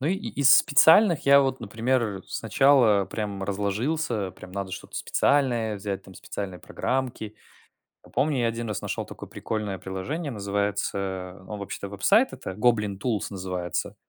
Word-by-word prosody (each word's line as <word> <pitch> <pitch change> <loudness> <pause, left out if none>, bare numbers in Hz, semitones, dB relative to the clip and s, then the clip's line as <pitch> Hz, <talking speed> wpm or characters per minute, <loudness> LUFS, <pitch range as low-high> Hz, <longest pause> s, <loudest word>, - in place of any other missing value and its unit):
Ну 135 - -2
и 185 - +2
из 195 - +4
специальных 165 +4 +5
я, 140 0 +8
вот 135 -2 -1
например, 115 -2 -1
сначала 120 -8 +3
прям 100 0 -4
разложился, 105 +3 -1
прям 90 - -13
надо 95 -1 -4
что-то - - -8
специальное 120 -6 +1
взять, 100 -1 -4
там 95 - -15
специальные 95 -2 -6
программки. 120 +1 -3 0.7
Ну - - -17
помню, 145 -1 +1
я 120 - +2
один 115 0 -4
раз 105 - -3
нашел - - -3
такое - - -10
прикольное 105 -3 -4
приложение, 135 - -4
называется 100 -3 -3
он, 105 - -5
вообще-то, 100 0 -6
веб-сайт 200 - +3
это - - -6
Goblin 105 -1 +1
Tools 110 -2 -1
называется. 90 -3 -3
105 Hz, 150 wpm, -26 LUFS, 100-130 Hz, 0.7 s, я